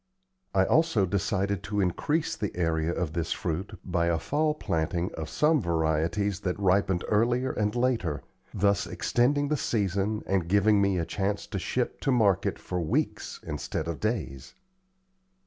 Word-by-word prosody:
I 95 0 +5
also 160 - +3
decided 100 +1 -1
to 105 0 -3
increase 145 - 0
the 105 -4 -4
area 80 -1 +1
of 85 -3 -2
this 85 -1 -2
fruit 90 +5 -4
by 85 -2 0
a 85 -1 +2
fall 150 - 0
planting 85 - -1
of 80 -1 -5
some 150 -1 +3
varieties 85 +3 0
that 90 -3 -2
ripened 95 -2 +2
earlier 120 +4 +2
and 105 +1 -1
later, 120 - 0 0.3
thus 100 0 +1
extending 145 +4 +1
the 150 - +1
season 105 -2 -1
and 95 -3 0
giving 100 +2 +4
me 100 -2 +2
a 85 - 0
chance 100 +3 -2
to - - -4
ship - - -2
to 135 - +1
market 105 -8 +2
for 90 -1 -4
weeks 80 - -2
instead - - -3
of 85 -2 -4
days. 90 - -3
100 Hz, 155 wpm, -28 LUFS, 85-110 Hz, 0.3 s, I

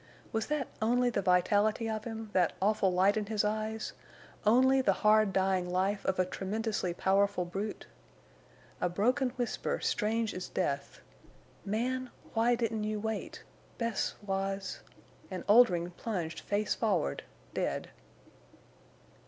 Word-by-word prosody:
Was 220 -1 -1
that 300 -3 -1
only 245 +2 +3
the - - 0
vitality 205 +5 +2
of 215 -1 -3
him—that 220 -6 0
awful 200 -1 +2
light 190 +4 +3
in 210 - -1
the 210 0 0
eyes—only 220 +3 0
the - - +3
hard 215 -1 +5
dying 190 -1 +1
life 190 +3 0
of 190 - +1
a 185 - +3
tremendously 200 0 -2
powerful 195 +1 +2
brute? 195 +4 -4 1.0
A 180 - +2
broken 250 +9 +1
whisper, 245 -3 -2
strange 220 +1 0
as 185 - -5
death: 140 -6 -2 0.6
"Man—why—didn't—you 230 -1 -1
wait! 220 +1 -4 0.3
Bess—was—" 195 -4 -2 0.5
And 185 -3 -5
Oldring 200 -6 +5
plunged 175 -5 -4
face 205 +1 0
forward, 195 - 0 0.3
dead. - - -2
210 Hz, 110 wpm, -31 LUFS, 190-225 Hz, 1.0 s, hard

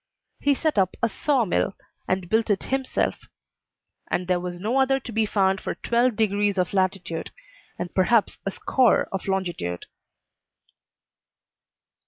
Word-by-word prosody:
He 285 0 +3
set 305 -6 +1
up 185 -1 +1
a - - +5
saw 260 +1 +1
mill, 190 +1 0 0.3
and 185 -1 -1
built 220 +4 +1
it 200 -2 +1
himself; 265 -1 0 0.9
and 180 - -1
there 180 -1 +2
was 175 0 -5
no 225 +8 0
other 270 0 +3
to 245 - -8
be 220 -1 +1
found 190 -2 +2
for - - -3
twelve 240 0 +1
degrees 205 -2 +1
of 180 0 0
latitude 185 -3 -1 0.5
and 175 0 -5
perhaps 210 +3 +2
a - - -1
score 245 +5 +2
of 195 0 -4
longitude. 175 - -2
200 Hz, 145 wpm, -24 LUFS, 185-235 Hz, 0.9 s, a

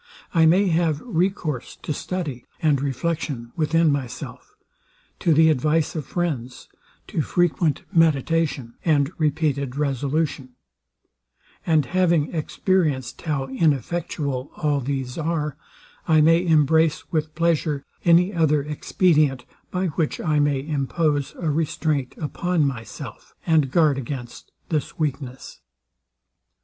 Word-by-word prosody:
I 165 -2 +5
may 185 +5 +4
have 160 -3 +1
recourse 175 - -1
to 150 - -2
study 145 -7 -4
and 150 -5 +2
reflection 140 -3 -3
within 165 0 +3
myself; 130 -4 -5 0.6
to 170 - +2
the 160 +1 +6
advice 155 +3 +1
of 150 -5 -4
friends; 140 -9 -3 0.4
to 160 - -2
frequent 165 -2 +1
meditation, 160 -5 +2
and 145 -3 +2
repeated 145 -4 0
resolution: 140 -1 -1 1.1
And 155 -4 +3
having 170 -3 +1
experienced 155 -5 0
how 145 -5 -1
ineffectual 140 -1 -1
all 145 -2 +1
these 135 0 -3
are, 155 -3 -1 0.5
I 160 -2 +5
may 165 +3 +4
embrace 160 0 +3
with 155 -1 -1
pleasure 155 -3 0 0.2
any 175 +3 +4
other 150 -4 +2
expedient, 150 -3 +1 0.2
by 185 +1 -1
which 155 0 -1
I 155 -3 +1
may 145 -2 +1
impose 145 0 0
a 160 -3 -1
restraint 150 -3 -1
upon 165 +2 0
myself, 125 -5 -6
and 155 -5 +3
guard 150 -2 +3
against 125 -2 -7 0.2
this 155 -3 -2
weakness. 140 -4 -4
150 Hz, 115 wpm, -23 LUFS, 140-165 Hz, 1.1 s, the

